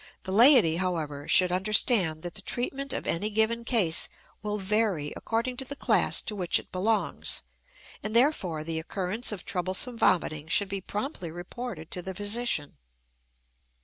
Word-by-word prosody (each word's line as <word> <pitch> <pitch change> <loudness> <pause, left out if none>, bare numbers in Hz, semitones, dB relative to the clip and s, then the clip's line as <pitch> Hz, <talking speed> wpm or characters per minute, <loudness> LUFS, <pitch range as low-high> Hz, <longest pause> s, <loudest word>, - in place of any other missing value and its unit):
The 190 - -5
laity, 225 - +7
however, 160 -6 -3
should 180 -1 +5
understand 185 -3 +2
that 175 -1 -5
the 200 - -4
treatment 270 +6 -3
of - - -3
any 200 +6 0
given 220 +2 +1
case 215 -10 +1 0.3
will 210 0 -3
vary 195 -6 0
according 235 +2 -2
to 265 - -3
the 285 - -5
class - - +2
to 210 - -3
which 180 -4 +1
it - - -9
belongs, 210 +4 0 0.6
and 215 +1 -4
therefore 200 - +2
the 160 0 -3
occurrence 190 +8 -2
of 205 -4 -6
troublesome 190 +6 -1
vomiting 155 -3 +1
should 195 +4 +1
be 195 0 -3
promptly 205 - -5
reported 175 +1 -7
to 180 - -2
the 190 +1 -7
physician. 205 - 0
195 Hz, 155 wpm, -27 LUFS, 175-230 Hz, 0.6 s, laity